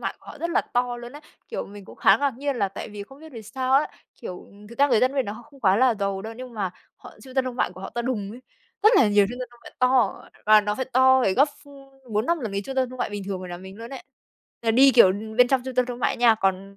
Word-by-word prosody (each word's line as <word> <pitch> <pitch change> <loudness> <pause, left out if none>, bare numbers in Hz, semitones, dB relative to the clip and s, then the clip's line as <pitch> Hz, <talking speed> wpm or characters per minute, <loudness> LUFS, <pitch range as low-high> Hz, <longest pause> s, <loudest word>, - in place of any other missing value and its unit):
mại - - -3
của - - -24
họ - - -10
rất 335 - -3
là - - +2
to 245 0 -2
luôn 240 0 -9
ấy. 295 +1 -11 0.3
Kiểu, 475 - -4
mình 200 0 -12
cũng - - -14
khá 195 - +5
ngạc 280 +1 -1
nhiên 280 -1 -2
là 200 -3 0
tại 195 - -8
vì 205 -1 -8
không 270 +7 -15
biết 315 -1 -13
vì 230 -3 -8
sao 255 +5 -3
á, 275 +3 +4 0.3
kiểu, 180 - -8
ừm, 205 +1 -17
thực 235 - -13
ra 285 +1 +5
người 235 -5 +3
dân 255 +1 +3
bên 270 - +1
đó 205 - -4
họ 230 +3 -11
không 280 -1 -19
quá 195 -4 +4
là 250 +1 +4
giàu 200 -2 -3
đâu, 220 +2 -6
nhưng 250 -1 -9
mà 200 -4 -2 0.3
họ - - -14
trung 260 -1 -13
tâm 265 -1 +2
thương 255 -1 -5
mại - - 0
của - - -12
họ - - -7
to 240 - -3
đùng 220 -5 -3
ấy, 235 +4 -10 0.4
rất 430 +3 +6
là 245 - +5
nhiều 205 -1 +4
trung 245 - -7
tâm 250 - -5
thương 240 - -20
mại - - -12
to, 255 -1 +2 0.2
và 215 0 +7
nó 210 0 -2
phải 260 - -3
to 260 +1 +5
phải 195 -5 +2
gấp 280 +7 +4 0.2
ph - - -18 0.4
4-5 235 +12 +1
lần 225 -6 -4
cái 200 0 -2
trung 270 - -6
tâm 260 -1 +1
thương 255 - -10
mại 220 - -2
bình 205 -1 -5
thường 190 -1 -4
ở 185 - -7
nhà 175 - -6
mình 190 +2 -11
luôn 230 +1 -9
ấy. 270 - -8 0.6
Là 225 - +2
đi, 265 +4 +6
kiểu, 235 -7 +6 0.3
bên 250 0 +6
trong 265 -1 +2
trung 260 -1 -6
tâm 250 0 +2
thương 245 -1 -6
mại - - 0
nha, 235 -2 +5
còn 195 -1 -2
240 Hz, 315 wpm, -24 LUFS, 205-260 Hz, 0.6 s, và